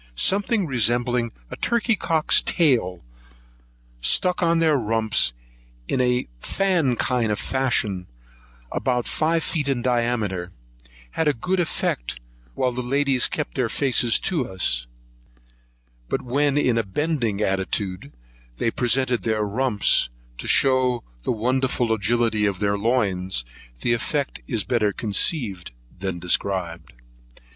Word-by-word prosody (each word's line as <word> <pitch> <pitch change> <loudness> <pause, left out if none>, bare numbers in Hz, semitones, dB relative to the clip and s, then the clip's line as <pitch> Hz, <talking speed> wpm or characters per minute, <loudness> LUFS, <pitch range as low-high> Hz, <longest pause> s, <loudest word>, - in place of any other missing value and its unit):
Something 200 - +1
resembling 120 -2 +1 0.2
a - - -4
turkey 235 -1 +1
cock's 160 -5 +2
tail, 120 - +1 0.9
and - - -28
stuck 180 - +3
on 170 -1 +3
their 160 -2 +3
rumps 110 - +1 0.6
in 130 - +1
a 125 0 +1
fan 175 - +1
kind 115 +1 0
of 105 - 0
fashion, 110 -9 0 0.6
about 125 -2 -1
five 165 +1 +1
feet 150 -4 -1
in 125 -3 0
diameter, 115 -8 0 0.6
had 160 - 0
a 150 - +4
very 120 - -17
good 185 0 0
effect - - -2 0.4
while 130 -1 +1
the 125 +1 -3
ladies 135 0 +2
kept 150 - -4
their 125 -4 0
faces 120 -2 +2
to 160 -10 -1
us; - - -2 1.2
but - - -1
when 140 +3 +1
in 125 -5 +2
a - - +1
bending 120 - -1
attitude, 95 -4 -2 0.5
they 115 - 0
presented 125 +1 +1
their 110 -2 0
rumps, 105 - +2 0.3
to - - -5
shew 130 -2 +3 0.2
the - - -1
wonderful 125 0 0
agility 110 0 +1
of 100 -2 -1
their 100 +1 +1
loins; 100 - 0 0.4
the 120 - +2
effect 140 +4 -2
is 115 -5 -1
better 110 -4 +1
conceived 105 - -1 0.3
than 95 -2 -3
described. 90 -4 -1
120 Hz, 130 wpm, -23 LUFS, 100-135 Hz, 1.2 s, a